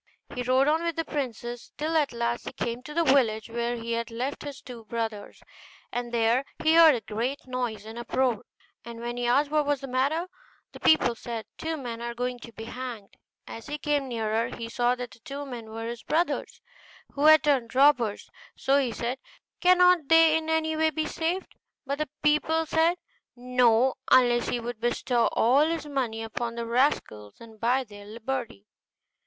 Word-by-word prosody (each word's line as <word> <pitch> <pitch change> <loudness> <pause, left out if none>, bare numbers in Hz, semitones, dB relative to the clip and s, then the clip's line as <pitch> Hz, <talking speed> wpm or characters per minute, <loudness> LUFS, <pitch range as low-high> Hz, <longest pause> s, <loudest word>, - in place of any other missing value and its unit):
He 250 - -3
rode 255 +2 +3
on 315 +2 +2
with 335 -1 -2
the 330 - -2
princess, 240 -4 -5
till 315 +2 -2
at 300 -3 +2
last 235 0 -2
he - - -6
came 235 +1 -3
to 300 +4 -9
the 335 - +3
village 235 -6 +2
where 235 +1 -1
he 230 0 -5
had 230 0 -2
left 250 +5 -4
his 285 -2 -7
two 240 -3 -10
brothers. 225 -2 -5 0.5
And 240 -1 -4
there 235 +2 +2 0.2
he 315 0 +4
heard 325 -3 +8
a 235 - -4
great 240 +7 -3
noise 245 -5 -3
and 225 +2 -8
uproar; 245 -1 0 0.4
and 235 0 -9
when 240 +1 -4
he 245 0 -2
asked 285 +4 +2
what 300 -1 +2
was 290 -2 0
the 275 - -6
matter, 280 +7 0 0.4
the - - -12
people 310 -6 +4
said, 230 -1 -6
'Two 320 0 -3
men 235 -4 -6
are 235 0 -4
going 245 0 -3
to 235 - -11
be 225 - -9
hanged.' 235 -3 -7 0.3
As 225 - -9
he 295 - -3
came 290 -2 0
nearer, 225 -2 -1
he 230 -1 -7
saw 245 +1 +1
that 245 -2 -6
the 220 - -16
two 280 +5 -7
men 240 -5 -8
were 225 +1 -6
his 235 0 -5
brothers, 335 +3 -1 0.5
who 285 +1 0
had 310 -2 +8
turned 255 -5 +1
robbers; 260 -6 +3 0.3
so 275 +1 +2
he 260 -4 0
said, 240 +4 -3 0.4
'Cannot 360 -3 +5
they 325 0 +6
in 320 0 -1
any 320 0 +1
way 315 0 +3
be 315 0 -2
saved?' 335 +4 -3 0.3
But 280 +2 -3
the 305 - -2
people 315 +2 +2
said 325 +3 +2 0.4
'No,' 250 0 +3 0.2
unless 240 -1 +4
he 245 - -1
would 235 -1 -6
bestow 240 0 +1
all 270 +7 +3
his 330 -1 -2
money 250 -6 -2
upon 230 +1 -4
the 235 0 -4
rascals 230 - 0
and 225 -2 -14
buy 250 +4 +2
their 205 -3 -13
liberty. 230 -1 -5
250 Hz, 195 wpm, -27 LUFS, 230-295 Hz, 0.5 s, heard